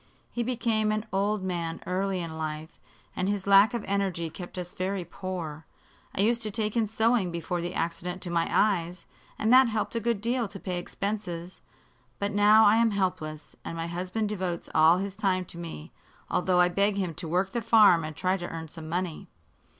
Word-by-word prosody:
He 240 - -2
became 225 -3 0
an 215 +1 -1
old 200 +1 0
man 170 -3 -3
early 185 +1 -1
in 165 -2 -6
life, 155 0 -5 0.4
and 185 +1 -1
his 200 -2 -2
lack 200 +4 +6
of 235 - -3
energy 190 -5 -1
kept 175 +2 -9
us 180 -1 -5
very 185 0 -2
poor. 165 -4 -6 0.5
I - - +1
used 230 +3 +2
to 215 - -2
take 215 +1 -1
in 225 -2 +2
sewing 220 -2 +2
before 170 +1 -3
the 175 +2 -4
accident 170 +2 -3
to 175 - -5
my 170 -1 +1
eyes, 180 -4 +1 0.3
and 220 +3 +2
that 260 0 +8
helped 220 -2 -2
a 230 - 0
good 230 -1 0
deal 235 +2 0
to 195 0 -10
pay 180 -2 -3
expenses. 185 -3 -5 0.6
But 200 0 -2
now 210 +2 +6
I 210 +2 +6
am 230 0 +4
helpless, 180 -7 -3
and 165 - -6
my 165 - -2
husband 185 +5 -2
devotes 185 -4 -3
all 160 +2 +6
his 195 +1 -3
time 185 -2 0
to 170 - -9
me, 160 - -8 0.4
although 180 0 +2
I 180 - +6
beg 200 +3 +1
him 185 -4 -1
to 170 +1 -6
work 185 +4 0
the 235 - -2
farm 215 -7 +6
and 155 0 -6
try 185 +3 0
to 175 -1 -6
earn 160 -1 -6
some 155 0 -9
money. 175 -1 -3
185 Hz, 200 wpm, -28 LUFS, 170-210 Hz, 0.6 s, that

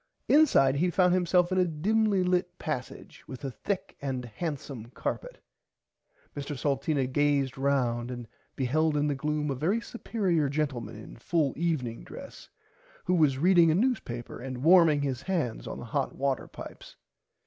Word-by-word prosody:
Inside 265 - +5
he 175 +5 +2
found 180 0 +3
himself 180 0 +2
in 185 - +2
a - - +5
dimly 200 +5 +1
lit 180 0 0
passage 130 -5 -6
with 130 +1 -8
a 135 - -3
thick 195 - -4
and 130 -3 -3
handsom 135 -3 -6
carpet. - - -4 1.0
Mr 145 0 -5
Salteena 140 0 0
gazed 140 0 +1
round 125 -3 0
and 120 -2 -6 0.3
beheld 150 +4 +1
in 145 - +2
the 145 - +1
gloom 150 +1 -1
a - - -1
very 170 - +1
superier 190 -10 -1
gentleman 135 -7 -2
in 110 - -11
full 145 +3 0
evening 145 -9 -2
dress - - -11 0.6
who 180 - +1
was 150 -6 +3
reading 170 +2 +5
a 155 - +3
newspaper 190 - -1
and 130 0 -6
warming 165 -4 +6
his 130 -2 -2
hands 155 -9 -2
on - - -5
the - - -7
hot 135 +4 -2
water 135 -1 -1
pipes. - - -11
145 Hz, 160 wpm, -28 LUFS, 130-175 Hz, 1.0 s, warming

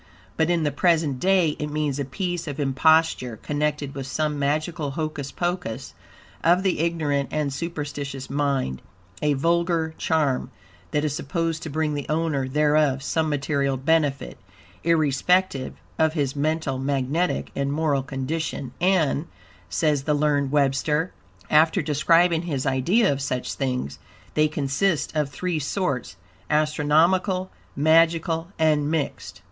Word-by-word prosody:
But, 160 +1 +1
in 170 -2 +2
the 145 - +1
present 155 -3 +1
day 185 -2 +3
it 150 - -2
means 150 -2 -1
a 140 - -1
piece 175 +4 -3
of 145 0 -5
imposture, 140 -3 +2
connected 145 0 -2
with 135 -1 -6
some 150 +2 -1
magical 155 +2 -1
hocus 150 -1 -4
pocus 175 -10 -3 0.5
of 175 +3 +4
the 190 -5 +1
ignorant 150 -5 0
and 150 -3 -1
superstitious 145 -4 -5
mind, 140 - -1 0.4
a 150 -1 +2
vulgar 165 +2 +1
charm, 150 -5 +1 0.4
that 150 0 0
is 150 -2 -1
supposed 165 +2 -2
to 160 - -5
bring 155 +1 -1
the 145 -1 -4
owner 155 -4 0
thereof 150 -1 +2
some 160 +2 0
material 140 -1 0
benefit, 145 0 0 0.4
irrespective 160 -1 +2 0.2
of 160 -1 +3
his 145 -4 -1
mental, 150 -2 -1
magnetic, 140 +5 -1
and 140 0 -1
moral 145 -2 +1
condition, 135 0 -4
"and," 170 -4 +2 0.4
says 140 - +1
the 150 - +2
learned 145 -2 +1
Webster, 150 +3 +1 0.3
after 160 +4 +4
describing 165 +3 +3
his 150 -6 -3
idea 145 - +3
of 140 - -5
such 130 -2 -2
things, 125 - -3 0.3
"they 155 0 +3
consist 150 +4 0
of 150 -2 +1
three 170 +4 -2
sorts, 145 - -2 0.3
astronomical, 160 +5 +2 0.2
magical 165 +2 +3
and 150 -2 +2
mixed." 160 -2 -3
150 Hz, 135 wpm, -24 LUFS, 140-165 Hz, 0.5 s, of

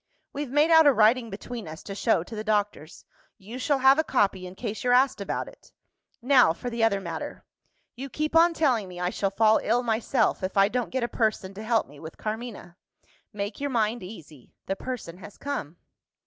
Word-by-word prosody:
We've 285 -1 -4
made 295 +5 +3
out 320 -2 +7
a 285 - +6
writing 230 +1 +3
between 220 +1 -7
us, 160 +1 -9
to 200 - -7
show 205 -4 +1
to 220 - -10
the 215 - -4
doctors. 205 -7 -2 0.3
You 215 +5 -9
shall 285 +2 +1
have 270 +2 +5
a - - +3
copy, 195 -9 0
in 180 - -11
case 220 0 -5
you're 245 0 +2
asked 255 -4 +2
about 200 - -3
it. - - -16 0.5
Now 250 - +5
for 245 +8 -6
the 230 -1 -1
other 210 -3 +3
matter. 195 - -7 0.5
You 270 +3 -7
keep 305 +3 -3
on 335 +1 +5
telling 250 -11 +1
me 180 -1 -9
I 180 0 -1
shall 195 - -1
fall 220 +2 +3
ill 240 +3 +1
myself, 230 +2 0
if 185 +1 -4
I 195 +1 +5
don't 245 +1 -2
get 260 -1 -2
a - - 0
person 215 -5 -1
to 200 - -9
help 225 -1 +1
me 145 +1 -15
with 160 +1 -10
Carmina. 215 -5 -6 0.5
Make 205 0 -5
your 285 - -1
mind 230 -2 0
easy 160 - -12
the 195 - -2
person 195 -7 -6
has 205 +1 -12
come." 175 - -5
220 Hz, 210 wpm, -26 LUFS, 195-255 Hz, 0.5 s, out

